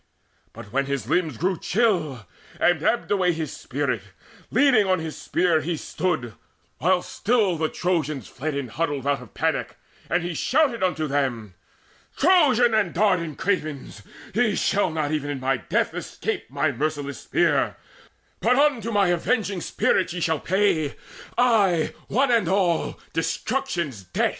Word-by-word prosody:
But 100 - -11
when 140 0 +1
his 140 -6 -3
limbs 155 -4 0
grew 185 0 0
chill, 170 - 0 0.3
and 175 -3 +3
ebbed 220 +5 0
away 185 -3 +3
His 160 -1 -4
spirit, - - -2 0.5
leaning 250 -8 +4
on 185 0 +3
his 160 -2 -5
spear 170 -3 +1
he 165 +1 -2
stood, 150 -10 -2 0.5
While 180 +4 +2
still 210 -5 +1
the 160 -1 -1
Trojans 155 -6 -1
fled 145 +2 -4
in 140 -3 -3
huddled 145 0 -2
rout 140 -2 +1
Of 120 - -14
panic, - - -1 0.3
and 175 0 +1
he 175 0 -3
shouted 260 - +1
unto 175 -4 0
them: 130 -8 -2 0.6
"Trojan 270 -9 +4
and 210 -5 +1
Dardan 180 -6 +1
cravens, 155 - -3 0.3
ye 220 -3 +2
shall 205 - +1
not 155 -2 -2
Even 150 -2 -2
in 145 -2 -3
my 135 0 +1
death, - - -1
escape - - -4
my - - 0
merciless 145 -3 -3
spear, - - +1 0.6
But 245 +3 +3
unto 270 -5 +2
mine 200 -4 +3
Avenging 200 0 0
Spirits 180 +1 +1
ye 175 - -4
Shall 160 -2 0
pay 175 -6 +1 0.4
ay, 205 -10 +3
one 260 +4 +2
and 230 -7 +3
all 185 -4 +1
destruction's 170 - -2
debt!" 90 0 0
175 Hz, 150 wpm, -24 LUFS, 145-205 Hz, 0.6 s, leaning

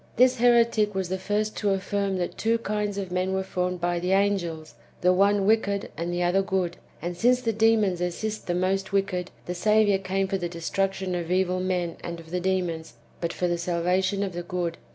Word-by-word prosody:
This 250 +1 +5
heretic 235 -3 +3
was 190 -2 -1
the 190 0 -2
first 210 +2 -1
to 205 - 0
affirm 195 0 0
that 175 -1 -3
two 225 +1 +1
kinds 210 -2 -2
of 190 -3 -4
men 185 +1 0
were 190 0 0
formed 180 -1 -2
by 175 0 0
the 180 +2 0
angels, 175 -8 0
— - - -30
the 180 +1 +4
one 200 +1 +3
wicked, 200 -2 +1
and 170 +1 -3
the 175 0 0
other 180 +3 +3
good. 190 -3 -1 0.3
And 175 +1 -3
since 245 +7 +3
the 230 -2 0
demons 215 -4 +3
assist 210 +5 -3
the 175 - 0
most 190 +2 0
wicked, 190 -2 0 0.2
the 180 - -3
Saviour 205 +2 +3
came 195 0 -1
for 195 0 -1
the 175 -1 -3
destruction 190 +2 -2
of 175 -1 -3
evil 185 0 +1
men 180 -2 -1
and 170 -1 -5
of 165 -1 -13
the 180 - 0
demons, 175 -3 -1 0.3
but 170 -1 -2
for 180 - -1
the 175 0 -1
salvation 180 +3 0
of 190 -2 -3
the 175 - -3
good. 175 -1 -3
190 Hz, 215 wpm, -26 LUFS, 175-200 Hz, 0.3 s, This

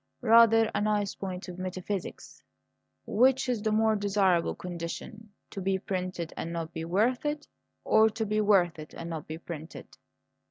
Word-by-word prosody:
Rather 225 -1 +6
a - - 0
nice 210 -1 0
point 185 -1 -6
of 180 0 -8
metaphysics: 185 +1 -5 0.6
Which 260 +5 +3
is 245 -4 -1
the 215 0 0
more 220 0 +3
desirable 195 -4 +1
condition, 180 +5 -7 0.2
to 195 - -6
be 190 0 +1
printed 185 -4 -4
and 165 - -4
not 165 -1 -4
be 165 - -4
worth 215 +9 +1
it, 295 0 -3 0.4
or 220 0 +5
to 220 +1 -3
be 215 +1 +1
worth 190 -6 +3
it 155 - -10
and 170 0 -6
not 160 -2 -6
be 155 - -5
printed? 165 -1 -9
200 Hz, 165 wpm, -28 LUFS, 175-220 Hz, 0.6 s, Rather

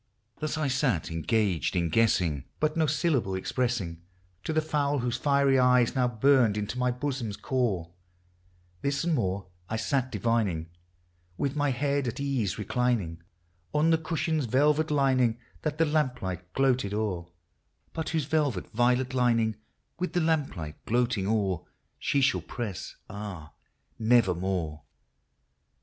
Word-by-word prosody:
This 155 +1 -2
I 155 -2 0
sat 125 - 0
engaged 95 +2 0
in 85 -2 +1
guessing, 85 -10 +2
but 155 0 +1
no 160 -1 +2
syllable 140 - +1
expressing 95 -5 -2 0.4
To - - -1
the 155 - +2
fowl 145 -2 0
whose 120 -2 -1
fiery 140 0 +3
eyes 125 -1 +4
now 125 -2 +2
burned 120 -2 +3
into 105 +4 -3
my 125 0 +2
bosom's 125 -4 -3
core; 105 -11 -1 0.9
This 140 +1 0
and 170 0 +1
more 95 -7 -1 0.2
I 110 - -1
sat 130 +2 0
divining, 105 -7 0 0.7
with 140 0 -1
my 145 -1 +1
head 140 +1 0
at 120 - -4
ease 135 -8 -1
reclining 105 -6 -1 0.5
On 155 +2 +4
the 160 - +4
cushion's 160 -2 -1
velvet 150 +6 +3
lining 130 -5 +3 0.2
that 155 -1 -2
the 165 - +4
lamplight 125 - -1
gloated 130 -7 +1
o'er, 95 -6 -2 0.7
But 160 -1 -3
whose 160 -3 0
velvet 145 - 0
violet 125 +3 +2
lining, 115 -3 +2 0.4
with 180 - -2
the 175 - +2
lamplight 140 - -1
gloating 120 -4 +1
o'er, 100 -5 +1 0.4
She 140 - +1
shall 135 - +3
press 110 -8 -5
— - - -45
ah! 95 -6 -7 0.5
nevermore 95 -8 +1
125 Hz, 140 wpm, -28 LUFS, 100-140 Hz, 0.9 s, eyes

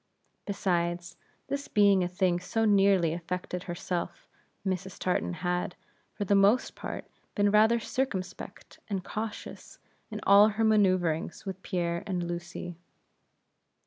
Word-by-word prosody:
Besides, 175 -3 -1 0.3
this 280 0 -4
being 200 -3 +4
a - - 0
thing 180 -1 +1
so 225 +5 -1
nearly 195 -5 +4
affecting 180 +1 -4
herself, 175 -1 -4 0.4
Mrs. 190 0 -3
Tartan 180 -1 -1
had, 180 0 -1 0.4
for 205 - -2
the 200 - +2
most 200 +5 +4
part, - - -6 0.3
been 205 -1 +3
rather 220 +3 +5
circumspect 205 -7 -4
and 195 -3 -2
cautious 215 +2 -6 0.3
in - - -5
all 200 +1 +7
her 215 +2 -1
manoeuvrings 185 -7 +2
with 190 -1 -6
Pierre 170 -3 -2
and 180 -3 -1
Lucy. 175 0 -6
185 Hz, 125 wpm, -29 LUFS, 175-205 Hz, 0.4 s, all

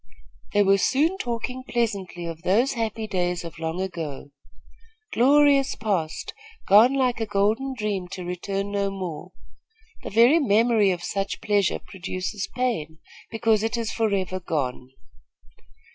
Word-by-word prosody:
They 205 - +5
were 195 0 +4
soon 310 - +2
talking 245 +2 -4
pleasantly 205 -8 -2
of 165 -1 -6
those 215 +9 +2
happy 225 -1 -3
days 180 -4 -1
of 165 -2 -9
long 165 +2 -3
ago. 160 -7 -5 0.8
Glorious 280 +2 +4
past, 185 -8 -2 0.3
gone 225 +7 +6
like 250 -4 +1
a 225 - -1
golden 215 +7 0
dream 205 -5 -2
to 185 - -6
return 195 +3 -3
no 200 -1 0
more! 185 -3 -6 0.7
The - - -6
very 240 +9 +5
memory 225 -4 +3
of 175 -2 -2
such 195 +1 -3
pleasure 205 -3 +1
produces 190 +1 -5
pain, 220 -12 -2 0.3
because 225 -2 +1
it 225 +2 -1
is 230 -1 -2
forever 195 -4 -1
gone. 130 -7 -3
205 Hz, 135 wpm, -24 LUFS, 180-235 Hz, 0.8 s, gone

